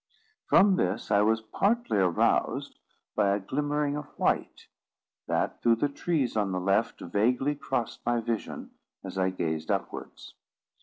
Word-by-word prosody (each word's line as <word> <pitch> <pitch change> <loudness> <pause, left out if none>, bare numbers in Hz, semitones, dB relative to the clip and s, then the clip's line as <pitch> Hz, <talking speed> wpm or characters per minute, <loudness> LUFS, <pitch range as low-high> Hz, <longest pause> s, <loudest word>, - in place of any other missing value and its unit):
From 195 -1 +5
this 95 +6 -1
I 100 0 +5
was 110 +1 +2
partly 200 - +1
aroused 90 -3 +1 0.4
by 100 0 +3
a - - -2
glimmering 145 +6 -1
of 150 -1 -5
white, - - 0 0.6
that, - - -1
through 115 -1 +4
the 145 +6 0
trees 145 -3 -1
on 105 -3 +1
the 90 - -1
left, 100 +4 0
vaguely 125 +10 +1
crossed 125 -5 -3
my 120 0 +1
vision, 115 -1 -4 0.3
as 95 - -5
I 95 0 +2
gazed 80 -3 -3
upwards. - - -4
115 Hz, 145 wpm, -28 LUFS, 100-145 Hz, 0.6 s, From